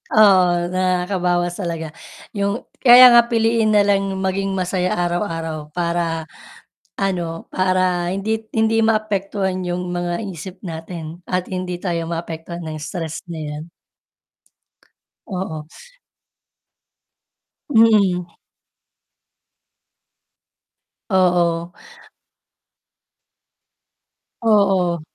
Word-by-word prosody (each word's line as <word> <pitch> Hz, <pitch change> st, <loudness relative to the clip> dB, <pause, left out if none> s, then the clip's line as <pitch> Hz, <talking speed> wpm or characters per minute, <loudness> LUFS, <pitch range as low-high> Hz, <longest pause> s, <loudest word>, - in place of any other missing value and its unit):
oo, 195 Hz, -4 st, +6 dB, 0.2 s
nakakabawas 180 Hz, -1 st, 0 dB
talaga, 165 Hz, -3 st, -4 dB, 0.4 s
yung 200 Hz, +3 st, -2 dB, 0.2 s
kaya 250 Hz, 0 st, +9 dB
nga 235 Hz, 0 st, +6 dB
piliin 225 Hz, -2 st, +2 dB
nalang 195 Hz, -1 st, +2 dB
maging 195 Hz, +1 st, -1 dB
masaya 185 Hz, 0 st, -1 dB
araw-araw 165 Hz, -3 st, -2 dB
para 170 Hz, -2 st, -1 dB, 0.7 s
ano, 175 Hz, -4 st, -2 dB
para 185 Hz, -1 st, +1 dB
hindi 220 Hz, +3 st, -2 dB
hindi 225 Hz, 0 st, +2 dB
maapektuhan 200 Hz, -3 st, 0 dB
yung 175 Hz, 0 st, -3 dB
mga 175 Hz, +4 st, -2 dB
isip 180 Hz, +3 st, -9 dB
natin 165 Hz, 0 st, -7 dB
at 180 Hz, 0 st, -1 dB
hindi 180 Hz, -1 st, -3 dB
tayo 170 Hz, -3 st, -3 dB
maapektuhan 165 Hz, 0 st, -6 dB
ng 155 Hz, -1 st, -5 dB
stress 165 Hz, 0 st, -5 dB
na 165 Hz, -2 st, -6 dB
yan. 150 Hz, +1 st, -6 dB, 1.6 s
Oo. 180 Hz, -7 st, -5 dB, 2.0 s
Mm. 200 Hz, -7 st, +3 dB, 2.8 s
Oo. 175 Hz, -2 st, +2 dB, 2.7 s
Oo. 195 Hz, -6 st, +2 dB
180 Hz, 80 wpm, -20 LUFS, 170-200 Hz, 2.8 s, kaya